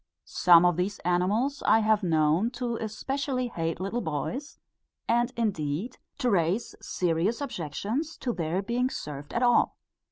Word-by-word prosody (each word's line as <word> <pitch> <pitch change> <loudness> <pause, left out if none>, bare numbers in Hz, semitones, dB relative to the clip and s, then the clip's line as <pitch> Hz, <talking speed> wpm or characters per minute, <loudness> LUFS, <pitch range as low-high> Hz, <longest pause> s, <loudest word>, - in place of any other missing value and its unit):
Some 175 -1 +6
of 175 -2 +3
these 195 +3 -1
animals 205 +11 +1
I 225 - +6
have 215 -1 +3
known 160 +3 +2
to 240 -2 -2
especially 255 +4 -2
hate 165 -5 -3
little 195 +6 -2
boys, 200 - -4 0.5
and 240 +2 +2
indeed 195 - -2 0.2
to 245 - +1
raise 185 +4 +1
serious 180 +6 0
objections 245 - -3
to 245 -2 -2
their 170 +2 -2
being 245 +4 0
served 145 - -7
at 235 - 0
all. 240 -1 +3
205 Hz, 140 wpm, -27 LUFS, 170-240 Hz, 0.5 s, Some